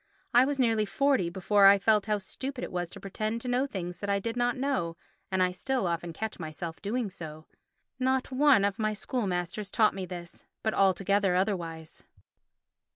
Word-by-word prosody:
I 245 +2 +7
was 285 0 -1
nearly 225 -4 +2
forty 265 -5 +2
before 195 +3 +4
I 200 +1 +8
felt 210 +1 +2
how 210 -1 +2
stupid 260 +7 -6
it - - -5
was 175 -1 -2
to - - -11
pretend 215 +3 -3
to 250 - -7
know 250 +3 +1
things 180 -7 -5
that 200 - -4
I 200 - +3
did 230 +4 -3
not 245 0 +1
know 255 -12 -1 0.3
and 190 -1 +2
I 180 - +2
still 255 +5 -2
often 170 0 -2
catch 220 +6 -5
myself 160 +1 -6
doing 215 0 -2
so. 155 -2 -9 0.5
Not 260 +1 +1
one 265 -5 +5
of 200 +1 -1
my 215 -1 +1
school 230 +1 -2
masters 180 +3 -3
taught 215 -1 +3
me 190 -1 -5
this, 175 -1 -9 0.2
but 220 - 0
altogether 195 0 +2
otherwise. 170 -5 -2
200 Hz, 190 wpm, -29 LUFS, 180-245 Hz, 0.5 s, I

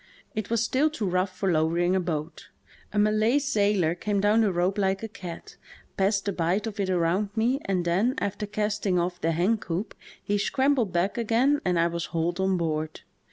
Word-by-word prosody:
It 215 -3 -4
was 230 0 +1
still 270 +6 +2
too 230 -10 -3
rough 185 +1 +1
for 195 -2 +1
lowering 170 +3 +2
a - - +3
boat. 165 -2 -4 0.4
A - - -4
Malay 215 +4 +3
sailor 205 - +2
came 200 +3 -1
down 210 +3 +3
the 210 -3 +2
rope 180 +3 0
like 195 +1 0
a - - -2
cat, 180 -5 -9 0.4
passed 195 +1 +1
the 200 - -1
bight 180 +5 0
of 215 -2 -6
it 195 -1 0
around 180 +3 +1
me, 240 +5 +1
and 185 -3 0
then, 200 +10 +1
after 205 +1 -3
casting 210 -2 -1
off 175 +1 -1
the 165 - +1
hen 190 +7 +1
coop, 190 +3 -4 0.3
he 205 0 0
scrambled 260 0 +1
back 180 +6 0
again 245 +6 +2
and 180 -2 +1
I 170 - +3
was 170 0 -2
hauled 170 +2 -2
on 190 -1 +2
board. 155 -2 -2
195 Hz, 200 wpm, -26 LUFS, 175-215 Hz, 0.4 s, a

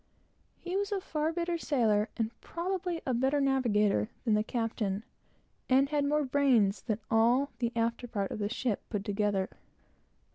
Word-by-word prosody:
He 355 +1 -5
was 400 +1 -1
a 400 - 0
far 315 -4 -1
better 340 0 -2
sailor, 225 -8 +2
and 225 -1 -1
probably 355 0 -3
a 260 - 0
better 265 +4 +2
navigator, 210 - +2 0.2
than 225 - +3
the 210 0 +3
captain, 220 -3 -2 0.7
and 270 +2 +4
had 290 -1 +1
more 300 +1 +2
brains 255 -7 +3
than 215 -3 -1
all 240 +5 +3
the 235 -1 0
after 230 +1 -1
part 200 -4 -2
of - - -4
the 205 0 -1
ship 235 -2 -1
put 205 -3 -3
together. 205 -2 0
245 Hz, 160 wpm, -30 LUFS, 210-290 Hz, 0.7 s, and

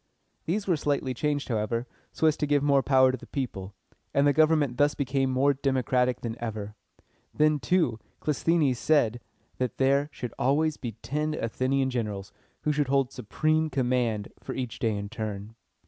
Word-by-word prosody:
These 200 +5 -1
were 175 -4 +2
slightly 140 -3 -1
changed, 145 +3 -1
however, 115 +1 -1 0.3
so - - -1
as 155 -2 +4
to 150 - -1
give 145 -1 +2
more 140 -1 +4
power 130 -1 +4
to 130 - -3
the - - -13
people; 105 -8 -5 0.4
and 140 - +4
the 145 - +4
government 155 -4 +3
thus 145 0 +3
became 135 -1 0
more 135 +2 +3
democratic 130 -2 +1
than 115 -1 -4
ever. 105 -2 -4 0.6
Then, 150 0 +3
too, 160 -9 +1 0.2
Clisthenes 150 -3 +1
said 120 -7 +2 0.4
that 125 -3 -2
there 140 +2 +2
should 125 -4 -6
always 150 +4 +2
be 120 -3 -5
ten 150 +2 -1
Athenian 130 +2 0
generals 105 -5 -3 0.3
who 150 - +2
should 145 -2 0
hold 135 -1 +2
supreme 155 +7 0
command 125 -6 0
each - - -28
for - - -5
a 130 - -1
day 115 -2 -2
in 100 0 -4
turn. 105 -1 -5
130 Hz, 175 wpm, -27 LUFS, 120-145 Hz, 0.6 s, as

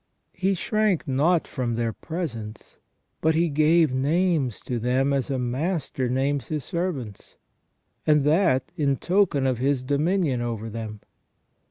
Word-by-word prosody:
He 190 +2 0
shrank 215 -1 0
not 155 +6 +2
from 120 -4 -2
their 115 -1 -1
presence, 115 - -6 0.4
but 160 0 +2
he 170 +1 +2
gave 155 0 +3
names 145 - +1
to 120 -2 -3
them 130 +4 +1
as 135 -2 -1
a 135 - -1
master 130 +1 -2
names 135 +2 0
his 150 -3 -3
servants, 150 - -4 0.7
and 150 -2 +4
that 150 -4 +2
in 145 -5 +1
token 175 -4 +1
of 130 -3 0
his 135 0 +1
dominion 145 0 +1
over 115 -2 -4
them. 110 -1 -6
140 Hz, 140 wpm, -25 LUFS, 125-165 Hz, 0.7 s, and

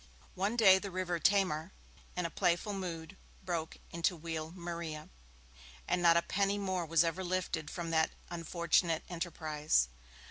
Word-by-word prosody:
One 200 +5 0
day 190 -4 +7
the 200 - -5
river 180 -2 -2
Tamar, 185 -2 +2 0.4
in 180 -1 -1
a 165 - -3
playful 175 +5 +1
mood, 175 -2 -5 0.3
broke 170 -3 -3
into 170 +1 0
Wheal 160 -1 -4
Maria, 170 -3 -6 0.8
and 180 - +1
not 170 -1 +6
a 170 - +3
penny 200 +1 +1
more 190 -4 -1
was 165 +1 +4
ever 170 +3 -1
lifted 180 -4 -2
from 170 0 -4
that 160 -1 +3 0.2
unfortunate 170 -1 +1
enterprise. 155 - 0
170 Hz, 145 wpm, -33 LUFS, 160-185 Hz, 0.8 s, day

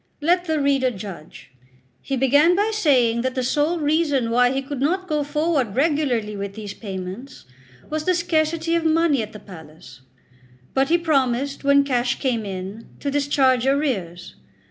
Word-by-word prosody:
Let 350 +4 +2
the 315 -2 0
reader 275 -2 +2
judge. 190 - -10 0.5
He 270 - -3
began 285 +7 +4
by 415 +3 +1
saying 255 - +2
that 260 +1 -2
the 255 - -1
sole 295 +6 +1
reason 295 -6 +1
why 245 +1 +4
he 270 +1 -2
could 275 -1 -6
not 370 +6 0
go 300 -3 0
forward 290 -6 -1
regularly 265 -7 0
with 200 0 -6
these 210 -2 -7
payments, 195 +6 -8 0.4
was 310 0 -3
the 365 - +2
scarcity 330 -1 0
of 335 -1 +1
money 320 -4 +2
at 215 - -6
the 210 - -10
palace; 155 -9 -14 0.7
but 270 +1 +1
he 340 - +4
promised, 275 -4 0
when 280 0 +4
cash 250 -2 0
came 235 -6 -1
in, 195 +3 -7
to 285 - -3
discharge 270 -3 +2
arrears. 235 - -2
275 Hz, 165 wpm, -22 LUFS, 230-310 Hz, 0.7 s, began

